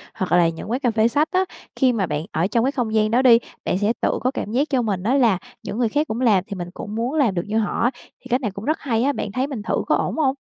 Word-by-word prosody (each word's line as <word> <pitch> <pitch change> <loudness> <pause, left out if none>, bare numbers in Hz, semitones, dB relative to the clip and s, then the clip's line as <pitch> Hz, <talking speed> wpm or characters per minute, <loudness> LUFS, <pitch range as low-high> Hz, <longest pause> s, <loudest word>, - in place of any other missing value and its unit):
hoặc 185 - -3
là 175 -1 +5
những 165 +5 -7
quán 250 - 0
cà 250 -4 +1
phê 220 0 +3
sách 290 +6 +1
á. 375 0 +2 0.3
Khi 255 -2 +3
mà 205 -5 0
bạn 150 -2 -3
ở 165 +3 +1
trong 230 +3 +1
cái 270 - +1
không 240 -5 -2
gian 215 0 +2
đó 245 +3 +4
đi, 240 -3 +7 0.3
bạn - - +1
sẽ 205 +3 +1
tự - - +1
có 255 +3 +1
cảm 215 - -4
giác 270 +6 +1
cho 265 -3 +2
mình 200 -5 -2
đó 230 +6 +1
là 235 -8 +4 0.3
những 215 - -5
người 240 -2 +1
khác 295 +6 0
cũng 225 +3 -3
làm 210 -7 +4
thì 200 - -5
mình 175 -2 -5
cũng 205 - -7
muốn 235 +4 -1
làm 270 -10 +3
được 175 - -1
như 215 +1 -1
họ, 225 +2 +1
thì - - -27
cách 250 +2 +1
này 215 -5 -2
cũng 200 +3 -8
rất 310 +2 0
hay 235 -5 0
á, 285 +2 +2
bạn 210 - -4
thấy 255 +5 -1
mình 270 -7 -5
thử - - -1
có - - +3
ổn - - -1
hông? 275 -4 +2
230 Hz, 315 wpm, -22 LUFS, 205-260 Hz, 0.3 s, đi